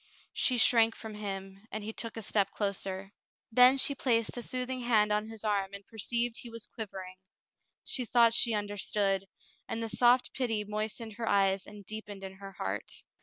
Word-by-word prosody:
She 255 - +2
shrank 225 -1 +5
from 220 -1 -8
him, 195 -2 -5
and 215 - -4
he 220 +1 -5
took 230 0 -5
a 225 - -3
step 205 -1 +2
closer. 195 -1 -3 0.4
Then 250 +3 +7
she 275 +1 +5
placed 230 -5 +1
a 245 - -4
soothing 255 +1 -3
hand 215 -3 +3
on 210 +1 +1
his 225 -1 -7
arm 200 -2 0
and 200 0 -10
perceived 235 +2 -2
he 240 - -8
was 230 -1 -5
quivering. 190 -5 -8 0.7
She 255 - 0
thought 235 0 +5
she 230 -1 +2
understood, 205 -1 0 0.4
and 230 - -3
the 225 - -2
soft 245 +3 +4
pity 225 -5 -1
moistened 215 +1 -4
her 230 -1 -2
eyes 195 -1 +2
and 205 -1 -11
deepened 210 -2 -8
in 190 0 -8
her 195 0 -10
heart. 95 - -4
215 Hz, 180 wpm, -31 LUFS, 200-230 Hz, 0.7 s, Then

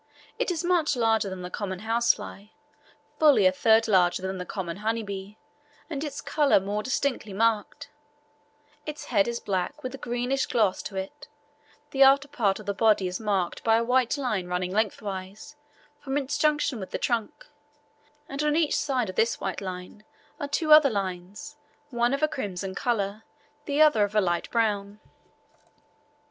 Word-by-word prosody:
It - - 0
is 345 -2 -2
much 345 -5 +2
larger 225 -3 +1
than 185 -1 -7
the 180 - -7
common 190 -2 -4
housefly, 230 -3 0 0.7
fully 290 -10 +5
a 185 - +6
third 220 +4 +3
larger 185 -3 +3
than 190 0 -3
the 180 - -6
common 180 -4 -5
honey 225 +2 -1
bee, 200 +1 -7 0.5
and 290 -1 -3
its 290 -2 -5
colour 295 -7 +3
more 200 +2 -3
distinctly 255 -3 -2
marked; 220 0 0 1.0
its 300 0 -6
head 200 -1 +4
is 235 0 -2
black, 200 +10 -3
with 255 0 -5
a 270 - -8
greenish 245 +3 -1
gloss 210 -6 +1
to 200 - -8
it; 190 +10 -6 0.6
the 270 - -1
after 275 +1 +6
part 230 -9 0
of 215 - -11
the 200 - -1
body 210 -2 +3
is 180 0 -3
marked 200 -5 -1
by 225 0 +4
a 230 - +1
white 250 +2 +2
line 215 -10 -2
running 180 0 -2
lengthwise 200 +3 -3 0.4
from 270 0 -3
its 280 0 -2
junction 295 -4 +1
with 190 - -7
the - - -3
trunk, 235 - -2 0.8
and 275 +2 -4
on 300 0 +1
each 320 -2 +2
side 260 -6 0
of 185 - -6
this 230 +1 +1
white 190 0 -4
line 185 +2 -7 0.4
are 285 - -3
two 305 +2 +3
other 305 -2 +8
lines, 200 +7 -5 0.3
one 240 0 +1
of 275 +2 -1
a - - +5
crimson 195 -9 -5
colour, 210 -1 -2 0.4
the 285 0 -1
other 300 -9 +5
of 205 +1 -2
a - - +5
light 175 -2 -1
brown. 210 -3 -1
220 Hz, 175 wpm, -26 LUFS, 195-275 Hz, 1.0 s, other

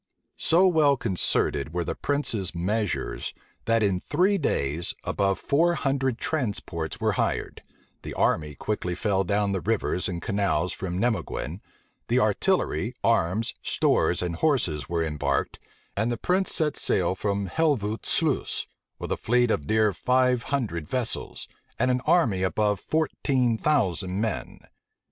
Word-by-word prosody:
So 175 +4 +4
well 155 -6 +4
concerted 85 - 0
were 90 - 0
the - - -3
prince's 115 -11 -1
measures, 100 +4 -2 0.3
that, 115 -1 +2
in 95 -3 +1
three 185 - +1
days, 75 - 0
above 100 -1 0
four 170 +4 +2
hundred 135 -4 0
transports 100 - -2
were - - +1
hired; - - -2 0.4
the - - -7
army 75 -2 +1
quickly 90 0 -3
fell 95 0 +1
down 100 +2 0
the 95 -2 -1
rivers 105 -4 0
and 85 -2 -3
canals 90 -4 0
from 90 -2 -4
Nimeguen; 95 - -2 0.5
the - - +2
artillery, 115 - +1
arms, 110 -1 +1
stores, - - +2
and 85 -2 -3
horses, 85 - 0
were 85 -1 0
embarked; 75 -3 -1 0.4
and 110 +4 0
the 120 - -2
prince 185 - +1
set 155 -3 +1
sail 90 -1 +1
from 100 0 -2
Helvoet 115 - 0
Sluice, - - 0 0.3
with - - -6
a - - 0
fleet 120 0 +2
of 75 - -1
near 110 0 +3
five 125 +2 +2
hundred 105 - -2
vessels, 125 -3 -2 0.3
and 130 +2 +2
an 125 0 0
army 115 - +3
of 95 - 0
above 105 -2 +1
fourteen 135 -6 0
thousand 95 - 0
men. 110 -1 -3
105 Hz, 145 wpm, -26 LUFS, 90-130 Hz, 0.5 s, So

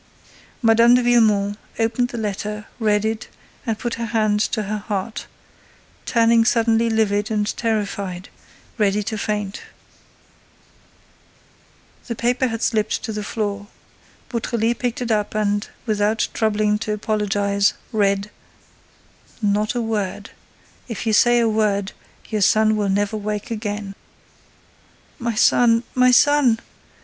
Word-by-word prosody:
Mme. 230 +2 +6
de 250 - +2
Villemon 210 -4 +3 0.2
opened 230 +2 +1
the 245 - -7
letter, 210 0 -4
read 210 -2 +2
it, 220 +1 -2 0.4
and 225 -2 0
put 235 +1 -3
her - - -1
hand 215 -2 +1
to 215 0 0
her 210 +1 -3
heart, 205 +1 -4 0.8
turning 230 -1 +4
suddenly 230 0 +2
livid 210 -1 +1
and 210 -1 -1
terrified, 200 -4 -3 0.5
ready 205 0 +2
to 220 - -4
faint. 210 -1 -3 2.5
The 235 - -3
paper 245 +3 +1
had 225 -1 -4
slipped 215 -1 0
to 220 0 -4
the 210 - -3
floor. 205 -1 -3 0.6
Beautrelet 235 -1 -1
picked 245 0 -2
it 235 - -2
up 210 -1 0
and, 205 -1 0 0.2
without 215 0 0
troubling 210 -1 +1
to 215 -1 -2
apologize, 205 -1 0 0.2
read: 200 -2 +1 1.1
Not 210 +1 0
a 240 - 0
word! 205 -2 -3 0.6
If 230 -2 -5
you 220 - +1
say 240 +3 +5
a 230 - +3
word, 210 -2 0 0.4
your 215 -2 -2
son 215 +2 +4
will 205 -2 0
never 205 +2 0
wake 210 +1 -4
again. 210 -2 -4 1.3
"My 235 -2 -2
son—my 245 +2 +3
son!" 255 -2 +4
215 Hz, 125 wpm, -21 LUFS, 205-230 Hz, 2.5 s, Mme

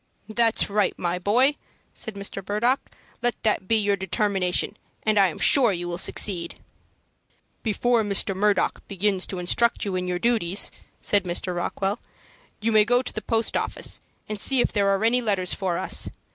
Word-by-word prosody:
"That's 225 0 +2
right, 205 0 0
my 175 0 -2
boy," 250 +10 +3 0.4
said 220 - -4
Mr. 200 0 -5
Murdock. 235 +6 +2 0.4
"Let 240 0 +2
that 210 -4 +1
be 225 - +3
your 205 -2 +2
determination, 195 0 0 0.3
and 215 -1 +2
I 195 - +6
am 170 - -6
sure 250 -6 +5
you 175 -2 -3
will 175 0 -3
succeed." 175 -5 0 1.1
"Before 235 +2 +1
Mr. 200 -2 0
Murdock 205 0 +1
begins 195 -1 0
to 190 - -5
instruct 215 +8 +1
you 195 -2 -2
in 180 0 -2
your 180 0 -1
duties," 200 -3 +1 0.3
said 205 -2 +2
Mr. 180 +1 -2
Rockwell, 195 +4 -2 0.6
"you 225 +2 +1
may 215 -1 +6
go 245 +3 +2
to - - -5
the - - -4
post 225 -1 -1
office, - - -1 0.3
and 210 -2 -4
see 270 -1 +4
if - - +2
there 200 -2 +2
are 195 +2 +1
any 245 +2 +3
letters 195 -5 0
for 185 -3 -2
us. 185 - -2
205 Hz, 175 wpm, -24 LUFS, 185-225 Hz, 1.1 s, I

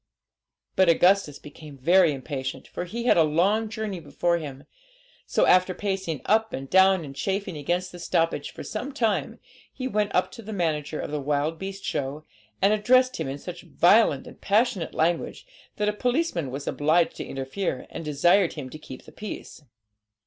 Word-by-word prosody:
But 190 -2 +4
Augustus 175 -3 +4
became 150 -1 -12
very 170 +5 +4
impatient, 135 -1 -5
for - - -5
he 230 +7 -5
had 240 - +4
a 165 - +6
long 195 +9 +2
journey 210 -3 -4
before 170 +3 0
him; 140 -3 -8 0.6
so, - - +2
after 185 0 +4
pacing 190 -8 -3
up 220 +1 +2
and 135 +1 -5
down 190 0 +4
and 135 -1 -9
chafing 195 +4 -2
against 175 +5 -2
the 175 - -10
stoppage 165 -3 0
for - - -9
some 250 +6 -5
time, 220 - 0 0.3
he 260 -1 -4
went 210 -4 -1
up 180 - +2
to - - -10
the 220 0 -7
manager 155 -5 -1
of - - -4
the 150 -1 -2
wild 150 +3 -1
beast 195 0 -6
show, 145 +2 -3 0.4
and 200 +2 +5
addressed 255 +5 +3
him 160 - -3
in 135 +1 -4
such 175 +4 -8
violent 175 -6 +3
and - - -13
passionate 205 -4 +1
language, 165 +2 0 0.3
that 210 - -1
a 210 - +1
policeman 245 - -1
was 140 +2 -6
obliged 160 +3 +2
to - - -4
interfere, 135 +2 -4
and - - -6
desired 165 +5 +3
him 135 -5 -7
to 155 - -9
keep 130 -4 -11
the - - -13
peace. 210 -5 -8
175 Hz, 180 wpm, -25 LUFS, 150-205 Hz, 0.6 s, a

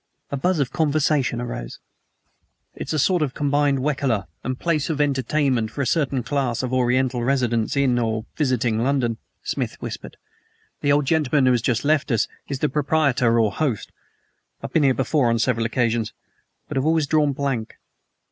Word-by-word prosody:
A - - -1
buzz 180 +6 +1
of 140 -4 0
conversation 150 -5 +1
arose. 120 - -5 1.0
"It - - -7
is - - -2
a - - 0
sort 175 +4 +2
of 140 -4 -1
combined 145 -1 +1
Wekaleh 135 -8 0 0.2
and 130 0 -3
place 160 -2 0
of 155 -3 -2
entertainment 135 -4 +1
for 140 +6 -3
a - - -2
certain 135 -4 0
class 130 -3 -1
of 130 0 -3
Oriental 125 0 +1
residents 120 -3 +1
in, 130 -3 +3
or 110 -1 -1
visiting, 125 -6 +1
London," 120 -2 +1 0.3
Smith - - -3
whispered. - - -7 0.6
"The 145 - +2
old 145 0 +3
gentleman 150 -2 +2
who 130 - +5
has 120 -2 +2
just 120 +2 0
left 155 0 +2
us 115 - +2 0.2
is 140 - -3
the 150 - +1
proprietor 135 -5 +2
or 110 -2 +3
host. 135 -9 -2 0.7
I - - -32
have - - -6
been 160 - +4
here 135 -3 +3
before 135 -1 +1
on 115 - +2
several 115 0 +1
occasions, 115 -2 0 0.5
but - - -4
have 135 - 0
always 160 -1 +3
drawn 150 0 +2
blank." 135 -5 -3
135 Hz, 180 wpm, -23 LUFS, 120-145 Hz, 1.0 s, who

